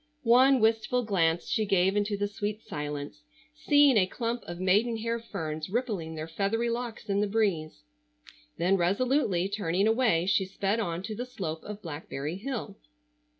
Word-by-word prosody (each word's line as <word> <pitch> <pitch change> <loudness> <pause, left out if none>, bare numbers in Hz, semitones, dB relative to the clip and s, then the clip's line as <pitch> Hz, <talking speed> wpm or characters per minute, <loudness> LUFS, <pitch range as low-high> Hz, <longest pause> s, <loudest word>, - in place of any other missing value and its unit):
One 255 +3 +6
wistful 225 +2 +2
glance 175 -6 +1
she 220 - +1
gave 195 -1 +2
into 205 0 0
the 205 0 0
sweet 210 +1 -4
silence, 145 0 -5 0.3
seeing 290 -4 +4
a 185 -3 +4
clump 235 +3 -3
of 175 0 -6
maiden 210 +6 +2
hair 230 +1 -2
ferns 155 -8 -5
rippling 200 -8 -2
their 155 0 -5
feathery 205 +8 -1
locks 235 -2 -5
in 200 0 +1
the 210 - +1
breeze. 195 - -1 0.7
Then 185 +3 +2
resolutely 195 0 +1
turning 195 -2 0
away 220 -7 +2
she 195 0 +2
sped 200 +3 -1
on 175 -4 -2
to 215 +2 -4
the 245 +4 -5
slope 170 -10 -5
of 210 0 -8
Blackberry 150 0 -5
Hill. 240 +2 -5
205 Hz, 160 wpm, -28 LUFS, 175-230 Hz, 0.7 s, One